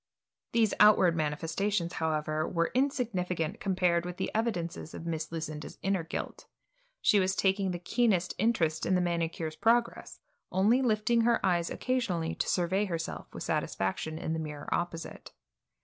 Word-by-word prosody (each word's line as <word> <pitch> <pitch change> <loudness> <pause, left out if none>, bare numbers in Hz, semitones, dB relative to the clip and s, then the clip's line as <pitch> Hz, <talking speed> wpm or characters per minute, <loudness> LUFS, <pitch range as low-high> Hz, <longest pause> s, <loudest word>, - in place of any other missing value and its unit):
These 225 -2 +3
outward 195 -5 +6
manifestations, 165 +4 -1
however, 155 -1 -1
were 170 -1 0
insignificant 200 - -1
compared 180 -3 +1
with 180 0 -6
the - - -2
evidences 175 -8 -2
of 165 - -7
Miss 160 -2 -3
Lucinda's 155 -2 -5
inner 195 -3 +1
guilt. 160 - -6 0.6
She 210 - +5
was 190 0 +1
taking 195 0 +1
the 180 - -2
keenest 180 -1 +1
interest 170 -8 +1
in 185 - +3
the - - +3
manicure's 165 -2 -2
progress, 235 +7 +1 0.3
only 210 +8 +3
lifting 230 -1 +2
her 235 0 +3
eyes 175 -2 +1
occasionally 205 -11 -1
to - - -2
survey 185 +3 +1
herself 165 -4 -5
with - - -7
satisfaction 95 +12 -2
in 160 - -3
the 160 - -2
mirror 150 -2 -5
opposite. 170 -1 -4
180 Hz, 150 wpm, -30 LUFS, 165-210 Hz, 0.6 s, outward